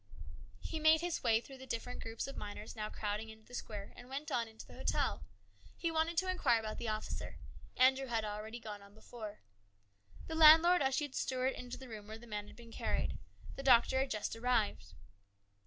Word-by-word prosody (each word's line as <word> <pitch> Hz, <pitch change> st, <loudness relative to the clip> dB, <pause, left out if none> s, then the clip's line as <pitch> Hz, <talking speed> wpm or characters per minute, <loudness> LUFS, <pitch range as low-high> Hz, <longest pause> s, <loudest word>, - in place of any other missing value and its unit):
He 320 Hz, -, -4 dB
made 315 Hz, +1 st, +6 dB
his 350 Hz, -1 st, -1 dB
way 225 Hz, -2 st, +4 dB
through 265 Hz, +3 st, -12 dB
the 265 Hz, -, -10 dB
different 245 Hz, +1 st, -4 dB
groups 225 Hz, 0 st, -4 dB
of 275 Hz, -, -7 dB
miners 210 Hz, +1 st, -7 dB
now 215 Hz, -1 st, -3 dB
crowding 210 Hz, +1 st, -3 dB
into 220 Hz, 0 st, -13 dB
the -, -, -17 dB
square, 205 Hz, -4 st, -6 dB
and 245 Hz, +1 st, -12 dB
went 280 Hz, +2 st, -5 dB
on 235 Hz, -2 st, +1 dB
into 220 Hz, 0 st, -11 dB
the -, -, -14 dB
hotel. -, -, 0 dB, 0.5 s
He 335 Hz, -, -1 dB
wanted 325 Hz, +1 st, +1 dB
to 375 Hz, +2 st, +2 dB
inquire 360 Hz, -11 st, +3 dB
about 215 Hz, -1 st, -5 dB
the 235 Hz, -, -3 dB
officer. 215 Hz, 0 st, -3 dB, 0.4 s
Andrew 265 Hz, +1 st, +5 dB
had 225 Hz, -3 st, 0 dB
already 215 Hz, +3 st, -5 dB
gone 210 Hz, -3 st, -7 dB
on 200 Hz, +1 st, -16 dB
before. 215 Hz, -1 st, -9 dB, 0.8 s
The -, -, -5 dB
landlord 320 Hz, +2 st, +8 dB
ushered 270 Hz, +1 st, +1 dB
Stuart 260 Hz, 0 st, 0 dB
into 250 Hz, 0 st, -7 dB
the 265 Hz, -, -10 dB
room 215 Hz, -3 st, -8 dB
where 220 Hz, +1 st, -7 dB
the 235 Hz, -, -13 dB
man 210 Hz, -2 st, -5 dB
had -, -, -13 dB
been 235 Hz, -1 st, -13 dB
carried. -, -, -1 dB, 0.4 s
The -, -, -5 dB
doctor 260 Hz, 0 st, +5 dB
had 270 Hz, 0 st, 0 dB
just 215 Hz, -1 st, -2 dB
arrived. 220 Hz, -, 0 dB
235 Hz, 200 wpm, -35 LUFS, 215-270 Hz, 0.8 s, landlord